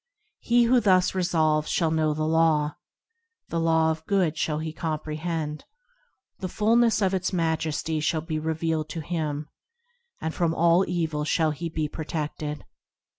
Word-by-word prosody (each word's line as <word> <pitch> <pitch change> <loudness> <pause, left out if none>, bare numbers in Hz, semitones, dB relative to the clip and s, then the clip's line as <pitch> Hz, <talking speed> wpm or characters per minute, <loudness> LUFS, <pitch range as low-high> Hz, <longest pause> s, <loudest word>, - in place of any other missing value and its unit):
He 240 0 +3
who 245 +2 +4
thus 185 -5 +3
resolves 160 -4 +1
shall 165 -3 +1
know 155 -1 +1
the 155 0 -1
Law, 155 -2 +2 0.7
The 165 - -1
Law 160 -1 +3
of 160 0 -5
Good 185 -6 +2
shall 155 -1 -1
he 155 0 -4
comprehend; 155 -1 -3 0.8
The 185 - -3
fulness 225 +2 +3
of 190 0 +2
its 185 0 0
majesty 160 -2 -1
shall 155 +1 0
be 155 -1 -3
revealed 160 0 -1
to 160 +1 -4
him, 150 -2 -3 0.7
And 160 - -3
from 165 -2 0
all 170 +3 +3
evil 160 -4 -1
shall 155 +1 +1
he 165 +3 -4
be 155 -1 -2
protected. 150 -1 -5
160 Hz, 150 wpm, -26 LUFS, 155-175 Hz, 0.8 s, who